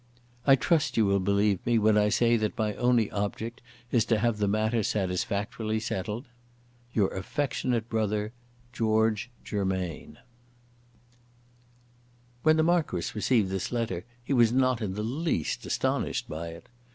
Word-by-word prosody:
"I 135 - +8
trust 155 +2 +1
you 110 - +5
will 100 0 +2
believe 100 0 +1
me 120 -1 +2
when 110 0 +4
I 105 0 +4
say 120 +2 +3
that 110 -2 -1
my 105 -1 0
only 120 -3 +2
object 110 +4 -3 0.3
is 120 -3 +4
to 115 - +2
have 110 0 0
the 105 - +1
matter 110 +3 +1
satisfactorily 105 +2 -1
settled. 110 +3 -3 0.7
"Your 105 -5 +2
affectionate 120 +1 -2
brother, 105 -1 -1 0.4
"GEORGE 110 0 +1
GERMAIN." 95 -4 -3 2.2
When 155 +2 +4
the 160 - +4
Marquis 160 - +1
received 105 -2 +1
this 95 -1 -2
letter 115 -8 -2 0.2
he 140 - -2
was 120 -3 +5
not 130 -1 +2
in 95 -3 -3
the 105 - -3
least 130 - -2
astonished - - -1
by 80 +2 -5
it. 85 0 -10
110 Hz, 140 wpm, -28 LUFS, 100-120 Hz, 2.2 s, I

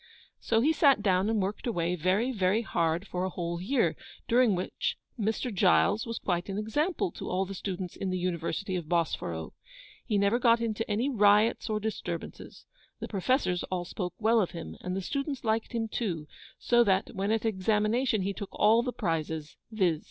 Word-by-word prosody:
So 225 -1 +1
he 305 +6 +3
sat 275 -8 +4
down 190 0 +2
and 225 -1 +1
worked 200 +5 -2
away, 175 -6 0
very, 190 +9 +1
very 205 0 +1
hard 170 -3 0
for 180 -1 -3
a 190 - 0
whole 170 -1 -4
year, 240 +6 +1 0.3
during 240 -4 +4
which 180 - -2 0.2
'Mr. 220 +3 -1
Giles' 200 +3 +3
was 230 - -3
quite 175 0 -2
an 195 - -3
example 305 - 0
to - - -7
all 190 +1 0
the 195 - -7
students 185 -2 -5
in 195 - -3
the 185 - -1
University 180 +2 -2
of 175 -3 -3
Bosforo. 85 - -1 0.5
He 210 - 0
never 200 +4 +2
got 235 -1 +4
into 225 -1 -2
any 220 +6 +1
riots 210 -3 +3
or 215 -1 0
disturbances. 220 0 -6 0.3
The - - -5
Professors 195 -2 +1
all 180 -1 -2
spoke 180 -1 -5
well 225 +1 +3
of 185 - 0
him, 170 -1 -7
and 180 0 -3
the 195 - -2
students 275 - -3
liked 220 0 0
him 230 -2 -1
too; 180 -9 -3 0.3
so 240 0 +4
that, 195 -3 +1
when 195 +1 -2
at 225 +1 +1
examination, 215 +2 +1
he 200 +1 -1
took 200 0 -6
all 220 +2 +4
the 250 +1 -2
prizes, 160 -6 -3 0.2
viz. 180 -8 +1
205 Hz, 190 wpm, -29 LUFS, 180-230 Hz, 0.5 s, sat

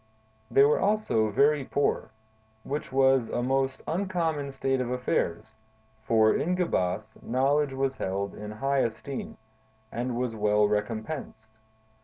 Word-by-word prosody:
"They 135 - +5
were 145 +1 +4
also 200 - +1
very 140 +6 +3
poor, 135 -4 0 0.5
which 145 +1 -4
was 135 -2 +3
a 120 - -1
most 135 +1 0
uncommon 165 -5 -1
state 135 -1 0
of 125 - -2
affairs; 110 -4 -1 0.5
for, 110 -1 +4
in 180 +4 0
Gebas, 110 - -1
knowledge 135 +2 +1
was 135 0 -1
held 100 +1 -2
in 105 0 -7
high 135 +6 0
esteem, 130 +3 -3 0.5
and 120 0 -3
was 125 -2 -2
well 105 0 +3
recompensed. 110 +3 -3
130 Hz, 130 wpm, -27 LUFS, 110-140 Hz, 0.5 s, They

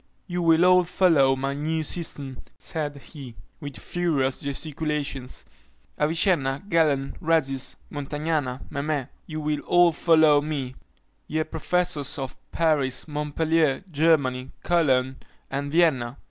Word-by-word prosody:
"You 175 0 -3
will 165 +1 +4
all 180 0 +6
follow 165 -7 +3
my 135 +1 -2
new 155 +3 -2
system," 145 -5 -4 0.2
said 150 -3 -4
he, 135 -4 -11 0.2
with 145 -3 -7
furious 150 -7 -1
gesticulations, 140 -2 -3 0.5
"Avicenna, 150 -3 +2
Galen, 150 -7 +1
Rhazis, 135 -5 0 0.2
Montagnana, 145 -2 -2
Memé, 140 -1 -2 0.2
you 155 -1 -5
will 150 -1 -1
all 175 +1 +4
follow 155 -3 +4
me, 145 -4 -4 0.5
ye 155 +1 -1
professors 160 -2 -1
of 135 -2 -5 0.2
Paris, 150 -6 +1
Montpellier, 150 +1 0
Germany, 140 -5 +2
Cologne, 135 -6 +2 0.3
and 140 +1 -3
Vienna! 140 -7 +2
150 Hz, 115 wpm, -25 LUFS, 135-165 Hz, 0.5 s, all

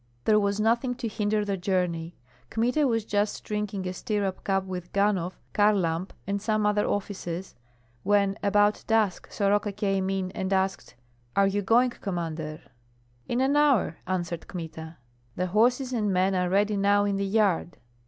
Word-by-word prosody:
There 215 -1 +5
was 200 0 0
nothing 235 +3 +1
to 240 - -4
hinder 210 -1 0
the 200 -1 -1
journey. 175 -3 -1 0.3
Kmita 250 +6 +1
was 225 -3 0
just 205 0 -1
drinking 210 -3 -3
a 185 - -3
stirrup 200 0 -2
cup 195 -1 +1
with 180 -2 -6
Ganhoff, 195 -3 +1 0.2
Kharlamp, 190 -4 +2 0.2
and 200 0 -2
some 215 0 0
other 210 0 +2
officers 190 -3 -4 0.5
when 200 +1 +2
about 205 +1 +2
dusk 220 -5 +1
Soroka 205 0 +1
came 195 -2 -1
in 190 -1 -2
and 190 0 -3
asked, 190 -8 -1 0.4
"Are 200 - +5
you 200 +1 +1
going, 240 +5 +3
Commander?" 165 -7 -4 0.7
"In 240 +2 0
an 270 +2 +2
hour," 275 - +3
answered 175 -3 -3
Kmita. 160 -2 -7 0.4
"The 180 - -1
horses 245 +7 +2
and 210 -4 0
men 190 +1 +2
are 180 -1 +1
ready 205 +2 +2
now 200 +1 +3
in 200 -1 0
the 200 - -1
yard." 195 -5 +1
200 Hz, 160 wpm, -27 LUFS, 185-210 Hz, 0.7 s, There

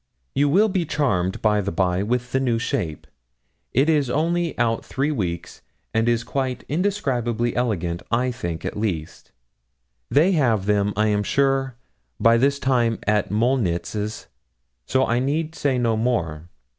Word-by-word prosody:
You 145 +1 +2
will 200 +9 +4
be 190 -4 0
charmed, 100 - -1
by 105 -1 +3
the 100 0 -3
by, 90 +1 +1
with 125 +4 -1
the 130 - +1
new 125 -3 +1
shape 115 - -3 0.7
it 135 +5 +3
is 150 -5 +2
only 165 +4 0
out 115 -1 +1
three 140 +3 -1
weeks, 90 - -4 0.3
and 115 +1 +2
is 120 0 +1
quite 130 -2 -3
indescribably 130 - -1
elegant, 90 -9 -1
I 125 +2 +1
think, 85 -10 -5
at - - -3
least. 95 -8 -4 0.8
They 160 +7 +4
have 120 - +2
them, 105 0 +2
I 105 +1 +2
am 105 -1 +1
sure, 135 +2 +1 0.4
by 115 0 +5
this 140 +3 +2
time 120 -4 +1
at 105 -2 +1
Molnitz's, 105 -2 -1 0.6
so 130 0 +2
I 120 +1 +1
need 155 +5 -1
say 140 -5 0
no 115 -2 +1
more. 85 -9 -1
120 Hz, 155 wpm, -23 LUFS, 105-135 Hz, 0.8 s, by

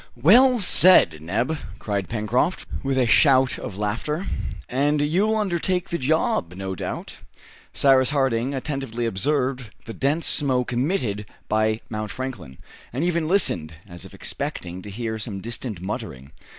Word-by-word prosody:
"Well 240 - +5
said, 180 - +6
Neb!" 115 - -1 0.2
cried 100 -3 -3
Pencroft, 115 - 0 0.2
with 135 -1 -1
a 130 - +3
shout 130 +2 +4
of 95 - -7
laughter; 115 - -2 0.4
"and 145 +4 +1
you'll 185 +9 +1
undertake 185 -2 -1
the 170 - -2
job, 130 - 0
no 95 0 -4
doubt?" 95 - -6 0.5
Cyrus 130 -2 +4
Harding 135 -2 0
attentively 135 -4 -3
observed 125 +3 0 0.2
the 115 - -7
dense 145 +7 0
smoke 130 -4 +1
emitted 120 - -1 0.2
by 110 +1 +1
Mount 110 -1 -4
Franklin, 125 - -7 0.3
and 130 +6 -2
even 170 -2 0
listened, 85 - +1
as 85 -2 -10
if - - -12
expecting 90 +1 -5
to 105 - -9
hear 110 +1 -4
some 105 -3 -4
distant 115 -3 -5
muttering. 70 -8 -6
125 Hz, 140 wpm, -23 LUFS, 105-150 Hz, 0.5 s, said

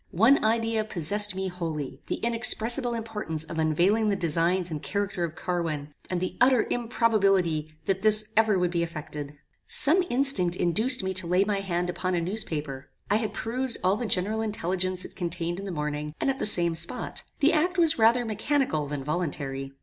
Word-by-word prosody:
One 240 +8 +4
idea 225 0 +1
possessed 205 +1 +1
me 190 0 -3
wholly; 155 -7 -5
the - - -2
inexpressible 235 +1 +1
importance 210 -9 -3
of 160 0 -6
unveiling 180 +8 +2
the 200 - +1
designs 175 +1 0
and 150 -2 -5
character 200 -3 -3
of 165 -2 -4
Carwin, 160 -5 -4 0.2
and 180 - -2
the 185 - -4
utter 250 -2 +4
improbability 195 -10 0
that 190 -1 -1
this 215 0 +3
ever 220 -2 +3
would 180 -1 0
be 170 -1 -1
effected. 150 -3 -6 0.3
Some 315 +8 +6
instinct 240 -10 +3
induced 215 +8 +3
me 190 0 -2
to 185 -2 +3
lay 180 +3 +3
my 200 -1 -1
hand 180 -2 -2
upon 185 +1 -2
a - - 0
newspaper. 155 -8 -4 0.2
I 210 - +4
had 220 -1 -3
perused 250 +2 0
all 185 +2 +2
the 230 +2 -4
general 210 +3 0
intelligence 185 -3 -2
it - - -12
contained 175 0 -3
in 200 - -7
the 195 - -5
morning, 150 -1 -4
and 270 - +1
at 270 - -7
the - - +1
same 170 -5 +4
spot. 165 +1 0 0.2
The 295 +4 +3
act 355 +4 0
was 325 -5 +3
rather 235 +2 +4
mechanical 220 - -1
than 145 -1 -5
voluntary. 140 -4 -4
190 Hz, 185 wpm, -26 LUFS, 165-225 Hz, 0.3 s, Some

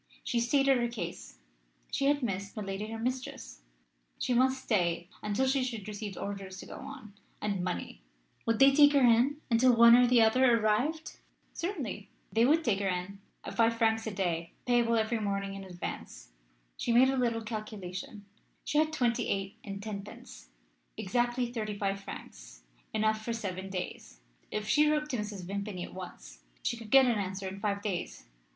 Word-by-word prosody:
She 240 - 0
stated 270 +2 +3
her 240 - +1
case 235 - -6 0.5
she 275 - 0
had 285 -1 +2
missed 200 -2 -3
milady 200 0 -4
her 225 0 -5
mistress 230 - -4 0.6
she 250 - 0
must 260 +2 +2
stay 175 -5 0
until 210 +5 0
she 265 0 +2
should 230 -5 -4
receive 205 -1 -6
orders 195 -2 -5
to - - -8
go - - -9
on, 265 -7 -10 0.3
and 200 -3 -2
money 85 - -4 0.5
would 230 0 +2
they 270 +2 +7
take 290 0 +7
her 280 - +5
in 245 +5 +4
until 240 +2 +5
one 235 0 +9
or 250 0 +6
the 245 0 +5
other 240 +2 +5
arrived? 250 +10 0 0.3
Certainly. 270 - -4 0.2
They 225 +1 +4
would 315 +5 +4
take 210 -7 +1
her 200 - 0
in, 185 +2 -3 0.2
at - - -6
five 230 0 +3
francs 225 -1 +2
a - - -2
day, 170 -4 -2
payable 240 -1 +3
every 225 +1 +1
morning 200 -1 -2
in 195 0 -7
advance. 175 - -7 0.5
She - - -1
made 255 +3 +6
a - - 0
little 235 -3 0
calculation 210 -2 -6 0.4
she 295 - +1
had 310 0 +2
twenty 245 -6 +1
eight 195 0 -3
and 200 -1 -6
tenpence; 200 - -8 0.5
exactly 240 +3 0
thirty 215 -3 -3
five 195 -1 -1
francs - - -10 0.3
enough 215 0 +1
for 235 - -2
seven 195 -4 -4
days. 180 - -6 0.3
If 210 0 -3
she 300 +4 +4
wrote 300 0 0
to 250 - -1
Mrs. 210 -3 -5
Vimpany 200 -1 -4
at - - -9
once - - -9 0.2
she - - 0
could 230 -2 -10
get 270 +1 +7
an 235 -4 +2
answer 190 0 -3
in 190 +1 -6
five 200 -1 -1
days. 190 -5 -4
220 Hz, 180 wpm, -30 LUFS, 195-245 Hz, 0.6 s, one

